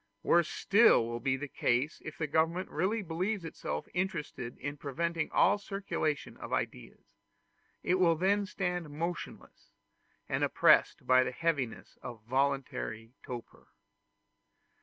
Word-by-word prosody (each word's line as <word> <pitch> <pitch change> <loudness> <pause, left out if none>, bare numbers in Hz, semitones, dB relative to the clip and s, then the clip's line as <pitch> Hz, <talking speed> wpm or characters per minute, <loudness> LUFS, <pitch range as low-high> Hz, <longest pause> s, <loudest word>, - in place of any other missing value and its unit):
Worse 170 -1 +4
still 205 - +5
will 120 0 -4
be 130 +1 0
the 145 +2 -5
case 130 +3 0
if 155 - -7
the 160 - -1
government 160 +4 0
really 200 +7 0
believes 180 +3 -2
itself 165 - -4
interested 165 - -3
in 145 +1 -4
preventing 160 +3 -2
all 205 +3 +4
circulation 195 -7 -3
of - - -8
ideas; - - -4 0.8
it 185 +1 +2
will 170 -2 +5
then 200 +4 +1
stand 180 -5 -2
motionless, 170 +4 -6 0.5
and - - 0
oppressed - - +4
by 130 0 +6
the 125 - -2
heaviness 140 -5 -2
of 120 -3 -8
voluntary 130 -3 -1
torpor. 120 -2 -9
160 Hz, 130 wpm, -31 LUFS, 130-180 Hz, 0.8 s, by